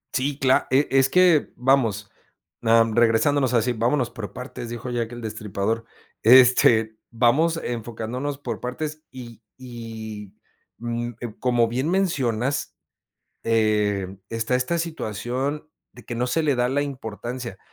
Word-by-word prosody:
Sí, 135 +2 0
cla 130 -2 +2
e 135 +3 +3
es 135 0 +4
que 180 -2 +4
vamos, 115 -6 +1 0.5
em, 115 -1 +4
regresándonos 120 +4 +3
a - - +5
decir: 120 +1 0
"Vámonos 125 +2 +1
por 105 -3 -7
partes 125 -2 -7
dijo 120 +1 -6
Jack 120 -1 -2
el 120 0 -8
destripador". 110 +1 -3 0.4
Este, 115 -2 +6
vamos 140 +8 +2
enfocándonos 120 +4 -4
por 145 - -5
partes 150 +5 -5
y 120 -3 -10 0.2
y, 110 -5 -8 0.4
mm, 120 +1 -3 0.3
como 120 -2 +2
bien 130 +6 -2
mencionas, 140 - 0 0.7
eh, 105 -4 +1
está 115 +2 -1
esta 130 +7 0
situación 140 - -3 0.2
de 125 - -15
que 120 - -6
no 125 +2 -1
se 160 +6 0
le 145 -3 +2
da 125 0 +1
la 145 +1 +1
importancia, 120 -4 -6
120 Hz, 135 wpm, -24 LUFS, 115-135 Hz, 0.7 s, Este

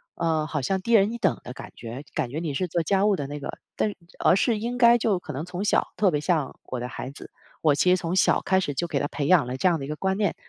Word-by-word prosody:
呃， 160 -2 0
好 150 -3 -2
像 190 +7 -1
低 230 - -3
人 210 +1 +5
一 235 - -4
等 - - +1
的 125 - -6
感 - - -10
觉， 120 +5 -7
感 140 -6 -1
觉 145 - -4
你 160 -4 -3
是 180 +6 -1
做 170 0 -1
家 195 +4 +2
务 210 - +3
的 145 - -4
那 145 +1 -6
个， 140 - -6 0.2
但 210 - 0 0.3
而 - - +4
是 225 +2 +2
应 240 +2 -3
该 240 -1 +6
就 215 -5 +1
可 175 - -8
能 145 +5 -4
从 180 +2 -5
小 205 - +2
特 190 -1 +3
别 150 - 0
像 155 -4 -1
我 125 -2 -5
的 125 - -4
孩 130 - -6
子， 140 - -12 0.3
我 150 -3 +4
其 165 +5 +2
实 180 - +6
从 170 -1 -3
小 - - +4
开 190 0 +2
始 145 -6 -2
就 175 - -1
给 145 -4 -1
他 - - -1
培 145 -2 -3
养 165 -8 +5
了 125 - -3
这 160 +8 +3
样 165 -3 0
的 135 - -5
一 - - -8
个 150 - -3
观 190 +4 -1
念， 205 -4 0
170 Hz, 325 characters per minute, -25 LUFS, 145-195 Hz, 0.3 s, 该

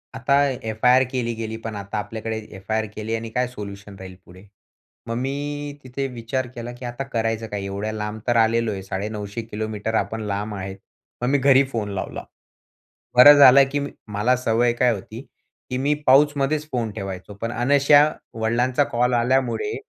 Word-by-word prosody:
आता 140 - +1 0.3
एफआयआर 125 +4 +4
केली 120 -2 -1
गेली, 110 0 -5
पण 115 -1 -6
आता 100 +1 -5
आपल्याकडे 110 +2 -4 0.2
एफआयआर 110 +3 -2
केली 110 +1 -3
आणि 115 0 -5
काय 125 +2 0
सोल्युशन 100 -3 -9
राहील 95 -1 -9
पुढे. 90 +2 -15 0.6
मग 115 - -3
मी 145 +2 -4
तिथे 130 +2 -4
विचार 125 +1 -3
केला, 120 0 -6
की 125 +1 -9
आता 120 +3 -4
करायचं 115 -3 -2
काय? 105 -2 -5
एवढ्या 100 +2 -3
लांब 105 0 -4
तर 120 -1 +3
आलेलो 115 0 +1
आहे, 95 -2 -5
950 105 +3 -4
किलोमीटर 110 0 -4
आपण 110 +2 -1
लांब 105 +1 -3
आहेत. 95 0 -6 0.4
मग 125 - 0
मी 145 - +3
घरी 135 0 +5
फोन 110 -4 -2
लावला. 95 - -5 0.9
बरं 145 +4 +11
झालं, 140 -1 +9
की 145 - 0 0.3
मला 110 +5 +2
सवय 120 0 +1
काय 125 +1 +2
होती, 110 +3 -8 0.5
की 125 - -2
मी 140 +3 +1
पाऊचमध्येच 145 +2 +3
फोन 115 -3 -2
ठेवायचो. 95 -1 -6
पण 115 0 -2
अनायासे 145 +4 +4 0.3
वडिलांचा 120 +5 +1
कॉल 125 -1 0
आल्यामुळे 130 - +1
115 Hz, 165 wpm, -22 LUFS, 105-130 Hz, 0.9 s, बरं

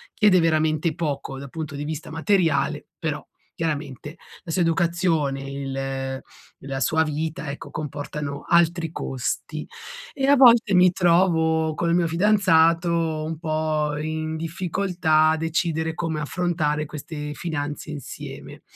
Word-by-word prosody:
chiede 205 -4 +5
veramente 155 -1 +1
poco 145 -5 -3
dal 140 0 -8
punto 155 -3 -5
di 145 - -4
vista 155 +1 -5
materiale, 160 -4 +1
però 150 -2 -3 0.3
chiaramente 150 -2 -4 0.3
la 165 - -5
sua 180 - +1
educazione, 165 -4 +1
il 135 -1 -4 0.4
la 135 -1 -3
sua 160 +4 +2
vita, 155 0 -3
ecco, 140 - -8
comportano 145 -1 -5
altri 170 -1 +3
costi. 130 -5 -4 0.5
E 270 -1 -1
a 285 +1 +6
volte 235 -5 +6
mi 180 0 +6
trovo 165 -3 +3
col 170 +1 0
mio 175 -1 +3
fidanzato 170 -2 +4 0.4
un 160 0 -4
po' 155 -2 -1
in 155 +1 -3
difficoltà 165 -1 +1
a 160 - +1
decidere 160 0 -1
come 160 -2 -3
affrontare 155 -2 -1
queste 150 0 -6
finanze 150 -2 -4
insieme. 145 -4 -8
160 Hz, 130 wpm, -24 LUFS, 150-170 Hz, 0.5 s, a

